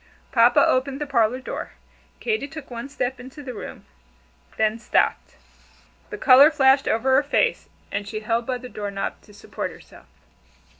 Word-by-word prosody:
Papa 240 0 +5
opened 270 +2 0
the 295 - -2
parlor 245 -3 +1
door. 260 - -6 0.5
Katy 440 -10 -1
took 295 -2 -10
one 235 +3 -6
step 255 -2 -3
into 265 +4 -11
the 255 -2 -6
room 215 - -9 0.7
then 220 +1 +1
stopped. - - 0 0.7
The 420 - -6
color 275 -2 +7
flashed 270 -3 +3
over 260 +4 +2
her 265 - +5
face, 295 - 0 0.2
and 205 - -3
she 215 +1 -5
held 230 +2 -1
by 255 -1 -1
the 250 +1 -10
door 205 -4 -5
knob 195 0 -4
to - - -19
support 205 - -6
herself. - - -16
255 Hz, 165 wpm, -23 LUFS, 230-275 Hz, 0.7 s, color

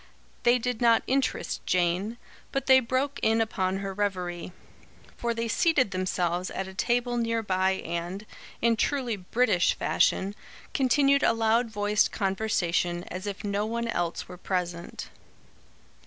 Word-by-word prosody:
They 240 +1 +4
did 250 -1 -3
not 230 -1 +5
interest 270 0 -1
Jane, 185 +5 +1 0.3
but 275 -1 -2
they 260 -1 +7
broke 260 +3 -1
in 225 +1 +3
upon 190 -4 0
her 195 0 -4
reverie; 185 -3 -2 0.6
for 235 - -2
they 230 0 -2
seated 260 - +2
themselves 180 -1 -1
at 190 - -4
a 190 - -9
table 240 +4 0
near 230 -1 0
by 190 -1 +1
and, 175 +4 -4 0.4
in 230 -1 +3
truly 255 -3 0
British 200 0 +2
fashion, 195 +2 +1 0.4
continued 280 +1 +3
a - - +4
loud 225 +1 +2
voiced 205 -1 +1
conversation, 180 -3 0
as 185 +3 -5
if 200 +1 -5
no 205 0 -1
one 235 +1 -2
else 175 -5 -2
were 180 - -10
present. 175 -2 -4
210 Hz, 140 wpm, -27 LUFS, 185-235 Hz, 0.6 s, they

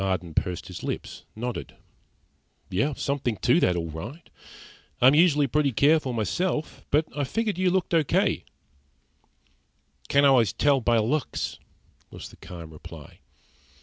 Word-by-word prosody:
Marden 90 -4 -2
pursed 90 +1 -2
his - - -8
lips, - - -5
nodded. 120 +2 -5 1.2
"Something 130 -6 -2
to 125 +7 +4
that, 90 - +2
all 85 -2 -3
right. 115 - -9 0.7
I'm 130 +3 +6
usually 150 -2 +4
pretty 145 +1 +1
careful 145 +2 +3
myself; 150 - -2
but 150 +2 +3
I 145 - -1
figured 210 - -2
you 185 -1 +3
looked 185 -1 0
okay." 160 -4 +2 1.7
"Can't 140 0 +4
always 125 -8 +4
tell 140 -2 +2
by 120 0 +2
looks," 125 +7 -1 0.5
was - - -9
the - - -17
calm 85 -3 -10
reply. 75 - -12
135 Hz, 130 wpm, -26 LUFS, 105-150 Hz, 1.7 s, I'm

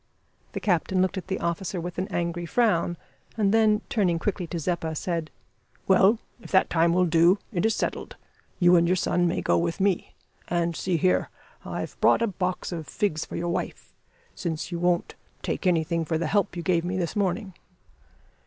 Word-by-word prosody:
The - - -3
captain 185 -1 +1
looked 185 +1 +1
at 185 - -12
the 190 0 -2
officer 170 +2 -2
with 175 +1 -5
an 190 - -1
angry 175 -3 -2
frown, 175 -6 +1 0.4
and 205 -2 +2
then, 215 -1 +4
turning 185 -6 +1
quickly 180 0 -2
to 170 - -4
Zeppa, 165 -1 -2
said 165 -1 -2 0.6
"Well, 195 +4 +5 0.2
if - - -11
that 190 - +3
time 170 0 +3
will 180 +1 +3
do, 170 +3 +4 0.2
it 190 +3 +2
is 225 - 0
settled. - - -3 0.4
You 175 -1 +5
and 170 0 +3
your 180 - +3
son 175 -1 +1
may 170 - -1
go - - +3
with 170 +2 -2
me. 195 -2 0 0.3
And, 170 -1 0
see 180 0 0
here, 180 +2 +2 0.3
I've - - -6
brought - - +4
a - - +4
box 185 -3 -3
of 165 -4 -5
figs 180 -8 -1
for - - -8
your 175 +1 -2
wife, 170 - -4 0.4
since 165 0 -4
you 170 - -3
won't 175 0 +1 0.3
take - - -2
anything 165 -1 +1
for 160 0 -1
the 165 - -2
help 205 -2 +1
you 170 - -4
gave 170 -2 +2
me 180 +1 -2
this 170 -3 -2
morning." 195 0 -1
175 Hz, 190 wpm, -26 LUFS, 170-190 Hz, 0.6 s, Well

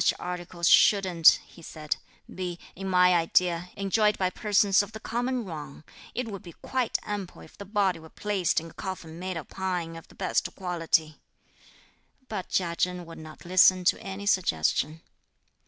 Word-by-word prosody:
"Such - - +3
articles 175 -1 -3
shouldn't," 185 -5 +6
he 170 - -16
said, 155 -2 -4 0.3
"be, 180 -2 -5 0.2
in 195 +1 -5
my 180 0 +5
idea, 175 +1 +2
enjoyed 210 +2 +2
by 185 -1 0
persons 205 -1 +3
of 205 +1 -7
the 220 - -7
common 245 +2 -2
run; 155 -4 -8 0.3
it 250 0 -2
would 200 -3 -6
be 175 -5 -11
quite 255 -3 -1
ample 205 -3 -5
if - - -16
the 200 - -9
body 195 -4 +1
were 160 0 -13
placed 195 -4 0
in 165 0 -10
a - - -19
coffin 175 -4 -7
made 185 -1 -4
of 160 - -7
pine 180 -3 -3
of 165 - -11
the - - -19
best 185 - 0
quality." 165 -4 0 1.1
But 205 -6 -5
Chia 170 -2 0
Chen 180 -1 -1
would 165 - -11
not 155 +2 -12
listen 185 +1 +5
to 175 - +2
any 195 +1 -6
suggestion. 155 - +1
180 Hz, 170 wpm, -27 LUFS, 170-195 Hz, 1.1 s, shouldn't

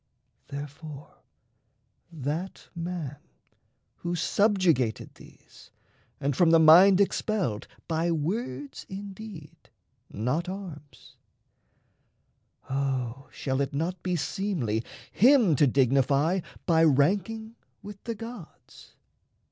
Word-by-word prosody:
Therefore 145 +1 -9 0.9
that 160 +4 -5
man 170 -5 -5 0.8
who 175 0 -3
subjugated 175 - +1
these, - - -17 0.5
And 140 -1 -1
from 175 +2 +4
the 165 - +7
mind 175 +5 +8
expelled, 195 - 0 0.2
by 165 +1 0
words 150 - -3
indeed, 195 -4 -9 0.4
Not 135 - -2
arms, 175 -7 -9 1.5
O 135 -1 -2
shall 130 0 -2
it 140 0 -2
not 170 +4 -2
be 180 -1 -1
seemly 155 - -2 0.3
him 240 - +5
To 145 +1 +4
dignify 140 +6 +2 0.3
by 165 -2 +4
ranking 200 - +1 0.3
with 205 -1 -10
the 230 -1 -3
gods? 230 -5 -11
165 Hz, 90 wpm, -27 LUFS, 140-195 Hz, 1.5 s, mind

